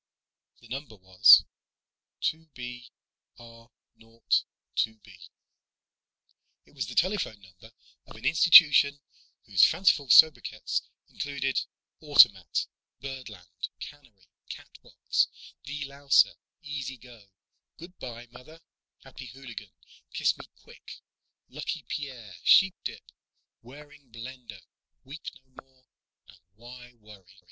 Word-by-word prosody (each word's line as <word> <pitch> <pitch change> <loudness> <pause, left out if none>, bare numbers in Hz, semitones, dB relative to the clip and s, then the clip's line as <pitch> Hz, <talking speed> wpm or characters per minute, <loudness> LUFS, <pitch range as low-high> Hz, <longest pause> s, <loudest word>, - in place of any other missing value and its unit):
The 115 - -17
number 130 -1 -8
was: 95 -1 +6 0.8
"2 160 0 -3
B 125 0 -9 0.5
R 115 0 -16 0.3
0 115 +1 -23 0.5
2 110 0 -1
B." 105 -3 -18 1.5
It - - -25
was - - -5
the - - -9
telephone 185 - -1
number 95 +4 -18 0.4
of - - -14
an - - -12
institution 150 -4 +6 0.5
whose 100 -4 +3
fanciful 160 -8 +3
sobriquets 120 -9 +4 0.3
included: 135 -2 -3 0.4
"Automat," 100 - +4 0.3
"Birdland," 125 -9 -9
"Cannery," 120 -11 -13 0.2
"Catbox," - - -3 0.4
"De 145 +1 -6
louser," 140 0 +2 0.3
"Easy 135 -3 -6
go," 115 -4 -17 0.5
"Good 180 +2 -14
by, 120 -1 -9
Mother," 125 +7 -15 0.4
"Happy - - -12
Hooligan," 120 -6 -11 0.4
"Kiss - - +1
me - - -13 0.2
quick," - - -14 0.5
"Lucky 150 +2 -6
Pierre," 125 -9 -7
"Sheepdip," 190 -1 +2 0.6
"Waring 145 +1 -16
Blendor," 115 -3 -11 0.4
"Weep 140 +5 -12 0.2
no 130 - -17
more" 130 -1 -33 0.4
and 95 - -19 0.2
"Why 125 +2 -14
Worry?" 100 -3 -18
125 Hz, 105 wpm, -27 LUFS, 110-145 Hz, 1.5 s, was